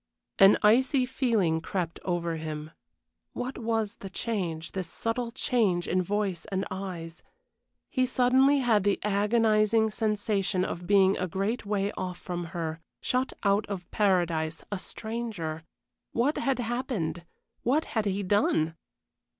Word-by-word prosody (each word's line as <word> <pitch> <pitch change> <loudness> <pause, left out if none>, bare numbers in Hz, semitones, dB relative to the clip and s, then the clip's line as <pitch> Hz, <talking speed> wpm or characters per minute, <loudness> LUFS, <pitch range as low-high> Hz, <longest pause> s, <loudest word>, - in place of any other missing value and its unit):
An 195 +1 +8
icy 255 +5 +4
feeling 220 - +1
crept 170 -2 -3
over 170 -2 -1
him. 155 -1 -5 0.6
What 255 +2 -4
was 225 -2 -1
the 195 - -8
change, 180 -7 -3
this 185 -3 -4
subtle 230 +1 -2
change 205 -8 +1
in 185 - +2
voice 195 -2 -1
and 190 -1 -2
eyes? 175 -3 -6 0.7
He 255 -2 +2
suddenly 260 +3 +4
had 225 -5 +3
the 200 0 +2
agonizing 215 +1 +3
sensation 205 -3 0
of 175 +1 -5
being 195 -1 +5
a 185 - -1
great 200 +6 -2
way 200 -1 0
off 180 -1 -4
from 175 -1 -4
her, 165 -1 -4 0.2
shut 255 +1 0
out 200 0 +2
of 190 -3 -6
paradise 170 -6 +1
a 205 - -2
stranger. 215 -8 -5 0.5
What 260 +6 +1
had 270 -1 +1
happened? 225 - -2 0.4
What 285 +7 +2
had 220 -2 +1
he 200 +1 -1
done? 180 -5 +2
200 Hz, 135 wpm, -28 LUFS, 175-230 Hz, 0.7 s, An